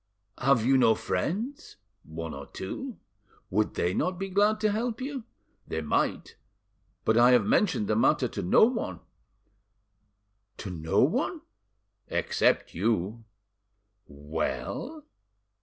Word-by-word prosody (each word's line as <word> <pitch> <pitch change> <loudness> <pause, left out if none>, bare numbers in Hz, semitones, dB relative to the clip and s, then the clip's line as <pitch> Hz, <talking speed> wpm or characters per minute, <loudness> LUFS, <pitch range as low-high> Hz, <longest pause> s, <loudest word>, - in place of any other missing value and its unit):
"Have 125 -3 +3
you 135 +1 +5
no 115 -3 +5
friends?" 200 - -3 0.3
"One 80 0 -7
or 70 0 -8
two." 250 - -6 0.5
"Would 105 +3 0
they 90 +1 0
not 180 - -1
be 195 +1 -4
glad 205 +3 +3
to 215 -1 +2
help 225 +2 -2
you?" 265 -2 -5 0.4
"They 80 - -3
might. 75 - -1 0.7
But 110 - +3
I 120 +1 +7
have 120 -5 +4
mentioned 165 - +2
the 110 - +1
matter 110 - +3
to - - -5
no 90 - +5
one." 225 - -3 1.6
"To 100 - -6
no 80 -2 +1
one?" - - 0 0.7
"Except - - +1
you." 110 +3 -1 0.8
"Well?" 75 - -4
115 Hz, 125 wpm, -28 LUFS, -, 1.6 s, I